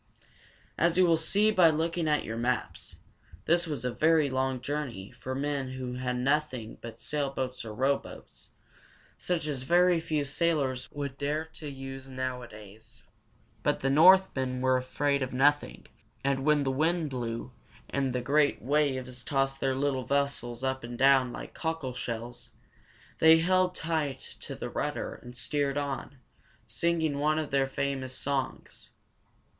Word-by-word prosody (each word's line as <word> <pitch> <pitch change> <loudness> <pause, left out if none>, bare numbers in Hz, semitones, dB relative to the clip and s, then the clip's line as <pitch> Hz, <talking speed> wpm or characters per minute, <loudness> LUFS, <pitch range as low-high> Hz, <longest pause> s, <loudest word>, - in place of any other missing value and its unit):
As 170 +1 +3
you 185 - +6
will 170 -1 +5
see 200 +7 +2
by 180 -5 +6
looking 165 +1 0
at 150 -1 +2
your 110 - -5
maps, 120 +2 -2 0.5
this 170 +1 +2
was 140 -6 -4
a 125 - -1
very 155 -2 +3
long 130 0 0
journey 125 -7 -4
for 130 0 -6
men 140 -2 -2
who 130 -1 -5
had 125 0 -2
nothing 130 -3 -1
but 115 -1 -9
sailboats 135 -3 -3
or 110 -2 -7
rowboats, 135 +4 -3 0.7
such 175 -3 -1
as 145 -4 -2
very 175 +4 +4
few 155 -2 -1
sailors 140 -4 0
would 140 -2 -5
dare 150 +3 -1
to 150 - -7
use 135 -1 -8
nowadays. 120 -4 -7 0.6
But - - 0
the 135 - +1
Northmen 150 -5 +5
were 130 0 +3
afraid 140 +2 0
of 130 -1 -3
nothing, 135 - +2 0.4
and 135 -1 0
when 150 0 +3
the 135 - 0
wind 160 +2 0
blew, 120 -1 -4 0.4
and 135 -2 -1
the 125 0 -1
great 145 +3 +2
waves 130 -2 0
tossed 135 -1 0
their 135 -1 0
little 135 -2 -1
vessels 140 -4 -1
up 130 -1 -1
and 120 0 -6
down 135 -1 +5
like - - -8
cockleshells, 125 -7 -4 0.7
they 160 0 +8
held 185 +2 +2
tight 155 -5 -2 0.2
to - - -7
the - - -5
rudder - - -3
and 125 0 -11
steered 140 +2 -1
on, 140 0 -4 0.5
singing 160 -4 0
one 155 +1 +2
of 155 -2 -2
their 135 -1 +2
famous 135 -1 -2
songs. 140 -2 -3
140 Hz, 150 wpm, -29 LUFS, 130-155 Hz, 0.7 s, they